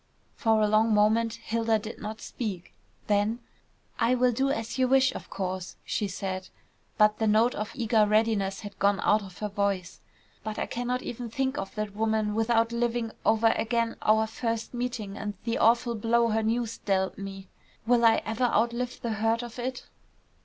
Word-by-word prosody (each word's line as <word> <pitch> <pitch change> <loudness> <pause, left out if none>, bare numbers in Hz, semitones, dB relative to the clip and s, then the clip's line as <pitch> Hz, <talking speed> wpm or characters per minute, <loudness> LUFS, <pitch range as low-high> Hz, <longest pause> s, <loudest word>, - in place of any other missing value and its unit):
For 220 -1 +2
a - - +3
long 215 +1 +3
moment 220 +2 +3
Hilda 230 -1 0
did 215 +1 -8
not 215 +1 -6
speak, 200 -7 -5 0.3
then 210 +2 +1 0.6
"I 240 +2 +3
will 250 0 +3
do 265 +4 0
as 225 -1 -3
you 255 - +4
wish, 265 0 +4
of - - -8
course," 185 -1 -4
she 210 - -1
said, 185 -1 -4 0.5
but 210 0 +4
the 220 - +1
note 220 +3 +4
of 210 0 -4
eager 225 -4 +3
readiness 210 -2 +1
had 205 -2 -9
gone 200 0 +3
out 215 +1 +3
of 190 -3 -11
her 210 - -3
voice. 200 -3 -2 0.4
"But 215 0 -4
I - - -1
cannot 245 +1 -2
even 240 0 -5
think 265 +3 -1
of 195 0 -6
that 215 -1 -4
woman 220 -1 0
without 225 +1 +2
living 235 -1 -1
over 225 +1 +4
again 230 0 0
our 220 +1 +3
first 230 +1 -3
meeting 240 -5 -4
and 205 -1 -4
the 230 0 -1
awful 235 +1 +3
blow 230 +1 +2
her 220 0 +1
news 230 +1 -1
dealt 190 -1 -1
me. 195 -1 -7 0.4
Will 240 0 +3
I 225 -1 +5
ever 225 +3 0
outlive 240 +2 0
the 235 - -2
hurt 225 +2 0
of 240 0 -8
it?" 255 +1 -4
225 Hz, 180 wpm, -27 LUFS, 210-235 Hz, 0.6 s, I